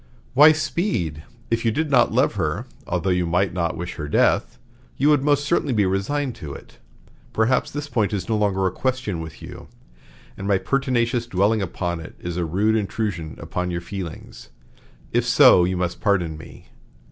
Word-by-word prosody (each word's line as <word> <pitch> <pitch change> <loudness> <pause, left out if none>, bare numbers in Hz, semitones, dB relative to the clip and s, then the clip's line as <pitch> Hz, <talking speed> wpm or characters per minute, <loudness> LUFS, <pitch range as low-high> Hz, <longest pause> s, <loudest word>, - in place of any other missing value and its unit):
"Why, 150 +4 +8
Speed, 155 - -1 0.3
if 115 0 +1
you 115 - +3
did 150 +7 -1
not 120 -3 +4
love - - +2
her, - - -2 0.2
although 95 - 0
you 90 -1 +1
might 90 +2 +1
not 85 -1 -1
wish 90 +2 -6
her 75 -3 -4
death, 75 - +2 0.4
you 145 +3 +3
would 145 -3 +4
most 145 -1 +2
certainly 150 -3 +1
be 105 -2 +3
resigned 120 +9 -1
to 70 -3 -7
it. - - -14 0.5
Perhaps 115 +3 +1
this 145 0 -5
point 110 -7 0
is 100 -4 -3
no 115 - 0
longer 100 -3 +1
a 95 - +1
question 125 -6 -2
with 80 -1 -9
you, - - -10 0.7
and 95 - -6
my 100 -2 +3
pertinacious 120 -1 0
dwelling 105 +1 +1
upon 85 -2 -3
it 80 - -10
is 85 -1 -5
a 90 -1 -1
rude 100 +7 +1
intrusion 100 -6 -3
upon 90 0 -3
your 85 -1 -2
feelings. 85 -7 -8 0.6
If - - +2
so, 90 - +6
you 90 0 -1
must 90 -1 -3
pardon 90 -6 +1
me. 80 - -13
100 Hz, 180 wpm, -22 LUFS, 90-125 Hz, 0.7 s, Why